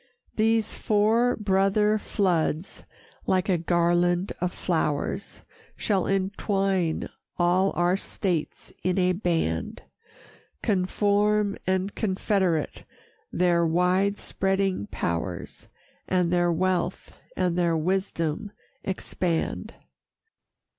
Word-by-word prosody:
These 225 0 +1
four 225 +4 +3
brother 210 +1 +2
floods, 175 -4 -1 0.4
like 185 +1 +1
a 180 -3 +2
garland 175 +2 +2
of 180 0 0
flowers, 160 +2 -2 0.3
Shall 195 -4 0
entwine 195 -3 0 0.3
all 180 +2 +3
our 175 +1 +2
states 180 -5 -3
in 185 0 0
a 185 -1 +3
band 165 - -1 0.8
Conform 205 +2 +2
and 190 +1 0
confederate 190 -5 0 0.5
their 175 -1 +2
wide 180 +4 +2
spreading 195 - -1
powers, 85 +1 -4 0.4
And 180 -2 +1
their 175 -1 +3
wealth 180 +1 -1 0.2
and 180 -2 +1
their 170 -2 +2
wisdom 185 +2 -1 0.3
expand. 180 -3 -2
185 Hz, 90 wpm, -26 LUFS, 175-195 Hz, 0.8 s, four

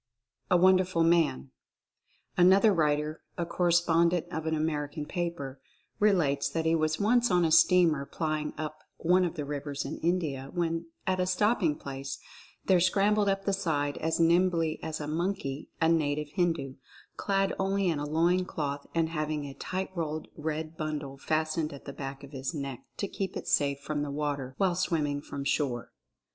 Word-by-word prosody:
A 180 - +5
WONDERFUL 185 -1 +4
MAN. 160 - +2 0.8
Another 195 +4 +6
writer, 150 -1 0 0.2
a 170 - -1
correspondent 170 0 +2
of 160 -2 -3
an 160 - +1
American 150 -1 -2
paper, 150 -7 -4 0.4
relates 165 -10 +2
that 165 -1 -2
he 160 - +3
was 155 -1 +1
once 240 +4 +3
on 180 -2 +3
a 160 - +1
steamer 160 -5 +5
plying 155 -2 -2
up 155 0 -5 0.2
one 180 +2 +3
of 175 -1 -2
the 150 -3 -3
rivers 145 0 -4
in - - -5
India, 155 -6 -1
when, 165 -1 -1 0.2
at 185 0 0
a 180 - +1
stopping 185 -4 +2
place, 135 0 -6 0.5
there 185 -2 +5
scrambled 200 +3 +3
up 195 0 -1
the 200 - +1
side 150 -7 -1
as 160 +1 -1
nimbly 170 -1 +3
as 160 -1 -4
a 150 - -4
monkey 155 -3 -2
a 160 - +3
native 150 -2 +1
Hindu, 165 -6 -1 0.4
clad 195 -1 0
only 195 0 +1
in 160 -4 +1
a 145 - -2
loin 170 +4 +2
cloth 145 -5 -4
and 165 -1 +2
having 155 -2 -2
a 140 - -7
tight 190 +6 -4
rolled 155 -3 -3
red 155 +1 -4
bundle 150 -3 -4
fastened 155 +1 -1
at 140 - -11
the 140 - -6
back 135 0 -7
of 140 - -11
his 135 +3 -4
neck 140 -4 -5
to 200 - -2
keep 190 -1 -4
it - - -7
safe 140 -1 +2
from 145 +1 -3
the 145 - -2
water 140 -2 -3
while 190 -2 +2
swimming 155 -5 0
from 140 -1 -6
shore. 135 -4 -1
160 Hz, 175 wpm, -29 LUFS, 145-180 Hz, 0.8 s, Another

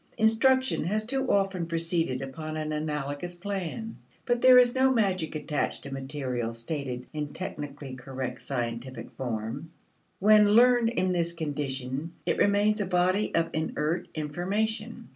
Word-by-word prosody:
Instruction 260 +4 +3
has 215 +4 0
too 265 +2 -1
often 195 -4 +1
proceeded 165 -5 0
upon 155 +3 -6
an 155 0 -3
analogous 150 +2 -3
plan. 200 +4 -5 0.3
But 240 0 +1
there 255 0 +8
is 245 -1 +6
no 265 0 +4
magic 190 -10 0
attached 150 -1 -2
to 140 - -8
material 130 -4 -3
stated 125 0 -4
in 150 -1 -4
technically 145 -6 -6
correct 130 -1 -5
scientific 120 0 -4
form. 120 +5 -4 0.5
When 210 +1 +6
learned 240 -1 +6
in 185 -5 0
this 170 -1 0
condition 145 -1 -3
it - - 0
remains 205 +1 +3
a 200 - -1
body 185 +3 +1
of 165 0 +1
inert 160 +1 -1
information. 215 +9 -2
165 Hz, 140 wpm, -28 LUFS, 140-210 Hz, 0.5 s, there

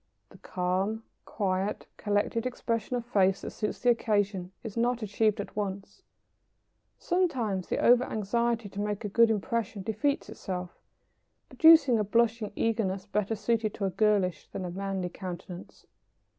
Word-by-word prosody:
The - - -17
calm, 190 +5 -1 0.2
quiet, 195 0 -2
collected 210 +3 0
expression 230 -1 -2
of 240 -1 -3
face 195 -5 +2
that - - -6
suits 210 - -3
the 245 - +3
occasion 205 -5 0
is 220 -4 -7
not 240 0 0
achieved 215 +1 +1
at 200 - -6
once. 200 - -4 1.0
Sometimes 250 - 0
the - - -1
over 245 +1 +5
anxiety 230 +1 -1
to 200 +1 -5
make 210 +1 -3
a - - -2
good 230 +3 +5
impression 220 -1 -2
defeats 225 +8 -1
itself, 180 -2 -6 0.7
producing 315 -7 +6
a - - +2
blushing 225 0 +1
eagerness 200 -4 -1
better 210 +1 -1
suited 215 0 0
to 200 - -2
a 190 - 0
girlish 200 -3 +1
than 185 - -6
a 175 - -4
manly 195 0 -3
countenance. 180 0 -8
210 Hz, 145 wpm, -29 LUFS, 195-230 Hz, 1.0 s, producing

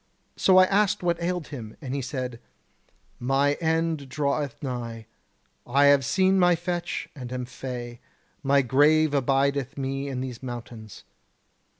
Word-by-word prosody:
So 185 -1 +4
I 185 - +9
asked 200 0 +1
what 170 -1 0
ailed 175 -1 -2
him, 115 -7 -8
and 135 -4 -6
he 140 - -1
said: 125 -2 -4 0.8
'My 135 +3 +2
end 160 -3 0
draweth 140 -1 -1
nigh; 120 -4 -5 0.6
I 140 +3 +4
have 140 -1 +6
seen 190 +7 +3
my 175 -1 +5
fetch, 175 +1 -3
and 125 -3 -8
am 125 -1 -3
fey. 120 -1 -7 0.4
My 140 0 +3
grave 145 +4 +4
abideth 140 +1 +1
me 135 +1 -3
in 135 -2 -3
these 125 -2 -6
mountains.' 120 -4 -8
140 Hz, 140 wpm, -26 LUFS, 125-160 Hz, 0.8 s, I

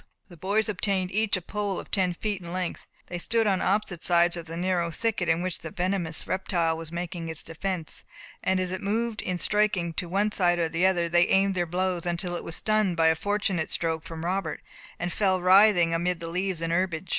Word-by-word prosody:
The 175 - -12
boys 200 +6 0
obtained 195 -2 0
each 215 0 +2
a 180 - -8
pole 205 0 -2
of - - -10
ten 185 -3 +1
feet 205 0 -3
in 170 -1 -7
length. 180 -1 -4 0.2
They 175 - -5
stood 225 +5 +1
on 195 -3 +2
opposite 195 -3 0
sides 175 0 +3
of 170 -1 -7
the 165 +1 -6
narrow 175 -1 0
thicket 200 -1 -1
in 165 +2 +2
which 185 -2 -3
the 160 - -7
venomous 175 -1 -2
reptile 175 -3 0
was 160 -1 -7
making 170 -1 -4
its 160 -1 -5
defence, 170 0 -4 0.4
and 190 0 +2
as 185 -1 -1
it 185 - -3
moved, 225 +2 -1
in 180 -1 -2
striking, 195 -4 +1
to 180 - -2
the - - -10
one 205 +4 +1
side 175 -3 +3
or 165 -2 0
the 170 +3 +2
other, 175 -3 +1
they 175 +1 +4
aimed 195 0 +3
their 175 -2 -1
blows, 180 0 -1
until 175 +1 -1
it - - -5
was 165 - -6
stunned 215 -5 +1
by 165 0 +5
a 160 - +3
fortunate 195 -2 -1
stroke 160 -1 0
from 165 -3 -7
Robert, 180 -4 -2 0.4
and 175 0 -3
fell 190 -3 +2
writhing 185 -2 +5
amid 175 +1 0
the 165 - -6
leaves 180 -1 -2
and 165 0 0
herbage. 180 -1 -1
180 Hz, 225 wpm, -27 LUFS, 170-195 Hz, 0.4 s, by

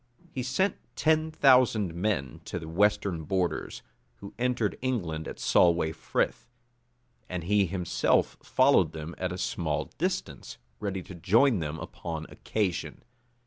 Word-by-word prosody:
He 130 - -3
sent 190 +11 0 0.2
ten 155 0 +2
thousand 125 - +4
men 85 - -2
to - - -4
the 80 - -7
western 95 -1 +1
borders, 95 0 -2 0.3
who 100 +11 -11
entered 120 -4 0
England 85 -12 -2
at - - -7
Solway 85 -2 +3
Frith; 115 +8 -2 0.8
and 90 -2 -3
he 100 +2 +3
himself 90 -1 +1
followed - - +3
them 80 +1 -6
at - - -1
a - - -4
small - - -2
distance, - - -3 0.2
ready 95 -3 -3
to 95 - -10
join 105 +7 +3
them 80 -1 -3
upon 80 -1 -6
occasion. 100 -5 -3
95 Hz, 135 wpm, -28 LUFS, 80-115 Hz, 0.8 s, thousand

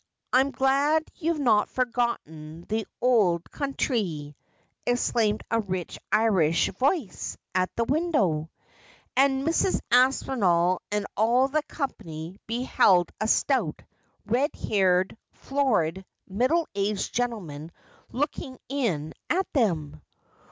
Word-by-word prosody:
I'm 265 +2 +4
glad 280 +4 +2
ye've 330 -1 -1
not 230 -7 +3
forgotten 200 -11 -2
the 220 0 -2 0.2
ould 195 -9 +3
counthry,' 205 - -2 0.5
exclaimed 230 -3 +1
a 230 - +3
rich 185 -4 -4
Irish 190 -7 +3
voice 270 - -1 0.2
at 185 0 +1
the 230 - +1
window; 230 - +1 0.7
and 270 0 +3
Mrs. 335 +3 +2
Aspinall 205 -9 +3
and 210 -1 0
all 240 +5 +3
the 305 +2 +1
company 175 - -6
beheld 220 -7 +3
a 215 - +1
stout, 225 - +1 0.4
red 255 +6 +1
haired, 185 -2 +1 0.2
florid, 210 - 0 0.2
middle 260 - +1
aged 200 0 -1
gentleman 180 -11 -3 0.4
looking 265 -1 -3
in 195 - -1 0.2
at 375 +4 +2
them. 160 - 0
225 Hz, 105 wpm, -26 LUFS, 180-270 Hz, 0.7 s, I'm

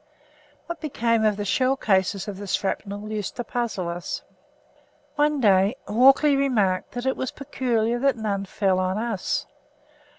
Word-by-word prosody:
What 340 -1 -6
became 230 -7 0
of 210 -2 +2
the 205 - -3
shell 260 +6 +2
cases 190 -3 +1
of 200 -2 -5
the 205 - -7
shrapnel 205 +2 -3
used 210 -3 -4
to 245 - -3
puzzle 230 -7 -3
us. 170 +1 -4 0.9
One 295 0 +2
day 200 -1 +4
Walkley 270 +6 +5
remarked 220 -10 +1
that 245 +1 -4
it 265 - +1
was 260 - -3
peculiar 240 -4 -1
that 275 -1 +2
none 200 -3 -2
fell 190 -1 0
on 185 +1 0
us. 230 +6 -2
220 Hz, 155 wpm, -24 LUFS, 195-260 Hz, 0.9 s, Walkley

